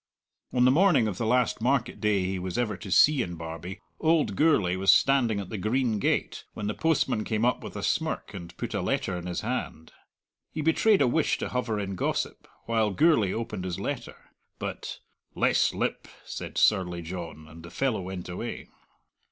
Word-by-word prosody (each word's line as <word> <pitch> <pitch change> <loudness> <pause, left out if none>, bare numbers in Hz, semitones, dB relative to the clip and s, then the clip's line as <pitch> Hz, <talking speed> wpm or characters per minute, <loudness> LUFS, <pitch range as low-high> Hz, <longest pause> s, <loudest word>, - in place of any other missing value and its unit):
On 125 0 +3
the 130 - +6
morning 155 - +4
of 95 -3 -4
the 115 - 0
last 125 -1 +2
market 125 0 0
day 105 -3 +2
he 95 0 -2
was 90 -1 -4
ever 115 -4 0
to 90 +2 -9
see 145 +8 +5
in 85 -6 -4
Barbie, 80 +3 -7 0.2
old 160 -1 +2
Gourlay 140 - +3
was 95 +1 +5
standing 125 -6 +3
at 95 -2 -6
the 110 - -4
green 110 +1 0
gate, - - 0
when 105 - -4
the 105 - -1
postman 150 -8 +1
came 110 +1 0
up 125 - +1
with - - -8
a - - -5
smirk, - - -1
and 85 -3 -9
put - - -4
a - - -1
letter - - -1
in 90 0 -5
his 90 -1 -3
hand. 105 -9 -4 0.6
He 155 - -3
betrayed 175 +3 +4
a - - +3
wish 155 +5 +1
to - - -4
hover 120 -4 -1
in 100 -1 -3
gossip, 90 - -2 0.2
while 110 -2 +1
Gourlay 110 - +3
opened 110 -4 -4
his 90 -2 -4
letter, - - -4 0.4
but - - -5 0.4
"Less - - +3
lip!" - - -2 0.2
said - - -7
surly 90 -4 +2
John, 85 -2 -7
and 80 +1 -12
the 85 - -10
fellow 130 -3 -1
went 90 -1 -6
away. 90 +7 -6
105 Hz, 195 wpm, -27 LUFS, 90-125 Hz, 0.6 s, the